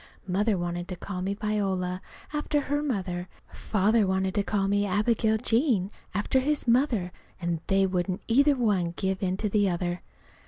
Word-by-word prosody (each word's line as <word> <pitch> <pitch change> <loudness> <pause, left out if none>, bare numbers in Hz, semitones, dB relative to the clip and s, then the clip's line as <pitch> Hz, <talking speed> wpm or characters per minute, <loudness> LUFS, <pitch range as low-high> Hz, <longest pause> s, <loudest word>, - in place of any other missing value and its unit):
Mother 200 +3 +1
wanted 175 0 -3
to 185 - -4
call 180 +1 -5
me 195 +2 -1
Viola, 195 -4 -1 0.3
after 295 0 0
her 290 +1 -1
mother, 185 -10 -2 0.2
and - - -14
Father 215 +1 +2
wanted 190 0 0
to 205 - +2
call 195 +1 0
me 205 +1 +2
Abigail 220 +3 +2
Jane 225 - +1 0.2
after 210 +6 +2
his 290 +1 -1
mother; 235 -7 +2 0.3
and 170 -2 -2
they 195 0 +3
wouldn't 185 0 -1
either 280 +5 +4
one 195 -9 +1
give 190 +1 -1
in 185 -1 0
to 210 - -1
the 205 -1 +2
other. 175 0 -2
195 Hz, 170 wpm, -27 LUFS, 185-225 Hz, 0.3 s, either